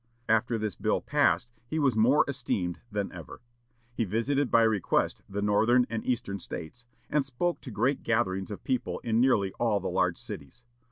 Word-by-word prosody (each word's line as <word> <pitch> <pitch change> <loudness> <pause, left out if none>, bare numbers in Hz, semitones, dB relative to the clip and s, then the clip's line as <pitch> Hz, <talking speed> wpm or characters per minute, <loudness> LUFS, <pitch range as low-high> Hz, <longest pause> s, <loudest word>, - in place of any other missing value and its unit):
After 115 +1 +2
this 105 -2 -2
bill - - 0
passed 120 - +1 0.2
he 155 - -3
was 140 -6 +2
more 125 +7 +4
esteemed 110 -10 -2
than 100 -1 -2
ever. 80 -6 -10 0.5
He 120 - 0
visited 120 +7 0
by 115 - +5
request 110 -4 +1
the 100 +1 -3
Northern 110 +4 +4
and 115 -1 -2
Eastern 115 -6 -2
States, 90 +7 -8 0.2
and 150 -2 +1
spoke 135 +7 -2
to - - -8
great 120 +6 0
gatherings 95 -5 0
of 105 - -7
people 130 -2 -1
in 115 0 +2
nearly 105 -7 +3
all 115 -4 +2
the - - -3
large - - +1
cities. 70 - -9
115 Hz, 175 wpm, -28 LUFS, 100-125 Hz, 0.5 s, by